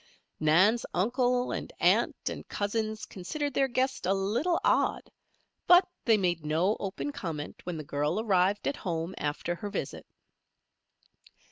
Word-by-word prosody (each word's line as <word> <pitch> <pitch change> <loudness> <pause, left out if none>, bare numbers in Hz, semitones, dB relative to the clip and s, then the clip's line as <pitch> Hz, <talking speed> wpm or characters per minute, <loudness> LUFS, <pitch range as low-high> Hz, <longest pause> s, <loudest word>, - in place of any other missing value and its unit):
Nan's 185 +10 +4
uncle 245 +6 +1
and - - -4
aunt - - +3
and - - -4
cousins 215 +1 -2
considered 285 +10 -4
their 270 +1 +2
guest 260 -5 -1
a 195 - +3
little 235 - 0
odd; - - +1 0.6
but 355 +1 +7 0.2
they 225 -2 +5
made 175 -5 0
no 165 +7 +1
open 200 +9 -4
comment 165 - -6
when 175 -2 -3
the 155 - -5
girl 150 +6 -1
arrived 200 -2 +2
at 280 - -1
home 170 -1 -3
after 150 +4 -2
her 205 +4 -6
visit. - - -5
200 Hz, 140 wpm, -29 LUFS, 175-245 Hz, 0.6 s, but